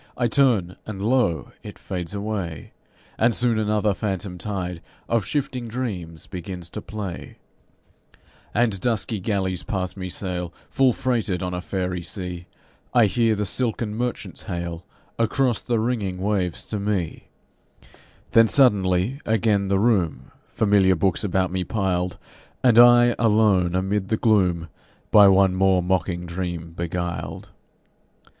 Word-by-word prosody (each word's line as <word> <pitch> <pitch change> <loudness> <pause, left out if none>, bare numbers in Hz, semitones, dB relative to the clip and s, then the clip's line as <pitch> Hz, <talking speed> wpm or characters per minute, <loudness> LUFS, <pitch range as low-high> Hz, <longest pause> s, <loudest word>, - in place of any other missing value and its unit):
I 120 - +1
turn, 115 -9 +2
and 105 -3 -6
lo! 110 -6 +1
it - - -10
fades 90 +1 -5
away, 100 -7 -4 0.5
And 115 +1 +3
soon 120 -2 +1
another 105 -1 +1
phantom 95 -3 -4
tide 90 -3 -4 0.3
Of 115 -4 +1
shifting 130 -4 -2
dreams 95 -10 -5
begins 90 -1 -7
to - - -5
play, 100 -4 -7 1.1
And 110 -4 +1
dusky 110 0 -1
galleys 95 -3 -1
past 95 -3 -3
me 95 -1 -5
sail, 90 -2 -4 0.2
Full 135 -1 +4
freighted 115 -8 -1
on 90 0 -3
a 90 - -3
faerie 90 -1 -3
sea; 90 0 -5 0.5
I 120 -2 +6
hear 115 +1 +2
the 105 0 -1
silken 115 -1 -1
merchants 120 +1 -4
hail 85 -1 -5 0.4
Across 120 +1 +1
the 120 -2 -1
ringing 110 -6 -1
waves 95 -3 -1
to 105 - -3
me 100 -5 -2 1.0
Then 115 0 +6
suddenly, 105 - +2
again, 105 -2 +1
the 100 0 +2
room, 100 -6 +1 0.2
Familiar 100 -3 +3
books 95 +4 0
about 95 -2 0
me 95 0 -1
piled, 90 -2 -1 0.5
And 120 -3 +6
I 120 0 +7
alone 105 -6 +3
amid 95 +1 0
the 110 - 0
gloom, 90 -8 +2 0.4
By 105 -2 +8
one 95 -1 +5
more 95 -1 +3
mocking 90 -1 -1
dream 85 -1 -5
beguiled. 85 +1 -4
100 Hz, 135 wpm, -23 LUFS, 90-110 Hz, 1.1 s, By